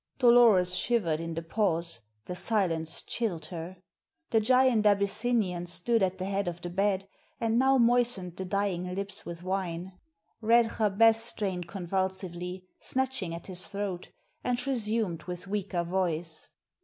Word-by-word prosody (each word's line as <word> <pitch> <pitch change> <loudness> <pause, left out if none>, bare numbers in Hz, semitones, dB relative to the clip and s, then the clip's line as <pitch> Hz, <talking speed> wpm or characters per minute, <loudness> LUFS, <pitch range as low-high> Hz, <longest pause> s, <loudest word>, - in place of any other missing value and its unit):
Dolores 235 -8 +6
shivered 180 -8 +1
in 165 0 -4
the 165 - -3
pause; 170 -2 -1 0.2
the 180 - -5
silence 175 -6 0
chilled 180 -10 -2
her. 170 +2 -6 0.5
The 225 - +4
giant 255 0 +4
Abyssinian 200 -2 +1
stood 185 +7 +1
at 190 0 +1
the 185 - -3
head 195 0 -1
of 175 0 -3
the 175 0 -6
bed, 195 +1 0 0.3
and 230 0 +1
now 265 +1 +4
moistened 235 -7 +2
the 190 - -4
dying 180 -2 -1
lips 200 +1 -4
with 170 0 -7
wine. 185 -1 -3 0.5
Red 230 +1 +3
Jabez 220 +2 +5
strained 200 -6 -2
convulsively, 185 0 -3
snatching 260 -10 -1
at 170 - -9
his 185 -1 -2
throat, 200 -3 -4 0.3
and 250 0 -1
resumed 220 -9 -1
with 180 0 -6
weaker 195 -3 -2
voice. 170 -2 -2
190 Hz, 145 wpm, -29 LUFS, 175-225 Hz, 0.5 s, Dolores